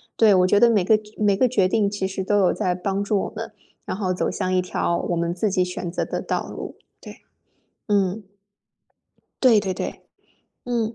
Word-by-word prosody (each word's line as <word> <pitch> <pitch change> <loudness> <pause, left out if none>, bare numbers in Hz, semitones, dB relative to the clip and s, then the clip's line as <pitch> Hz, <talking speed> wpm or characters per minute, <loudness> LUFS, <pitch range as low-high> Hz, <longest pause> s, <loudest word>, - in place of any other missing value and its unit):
对， 220 -3 +5
我 180 0 +4
觉 205 +2 +4
得 240 - +6
每 210 -5 +3
个 220 - +5 0.2
每 205 -2 +2
个 255 - +3
决 205 -7 +2
定 205 0 +1
其 200 -2 -2
实 190 0 -4
都 205 +2 +1
有 190 -3 +3
在 180 -1 -1
帮 195 +2 -2
助 205 0 +1
我 - - -6
们， - - -6 0.3
然 - - -4
后 185 -3 -1
走 - - -1
向 185 - -2
一 185 - +3
条 180 -1 -1
我 175 - -2
们 170 0 -1
自 200 +4 0
己 185 -1 +1
选 180 -1 -5
择 - - -2
的 - - -4
道 - - -2
路， - - -7 0.3
对。 - - -12 0.7
嗯。 200 0 0 1.2
对 235 -5 +6
对 190 -2 -2
对， - - -6 0.6
嗯。 235 -2 -1
195 Hz, 220 characters per minute, -23 LUFS, 185-215 Hz, 1.2 s, 得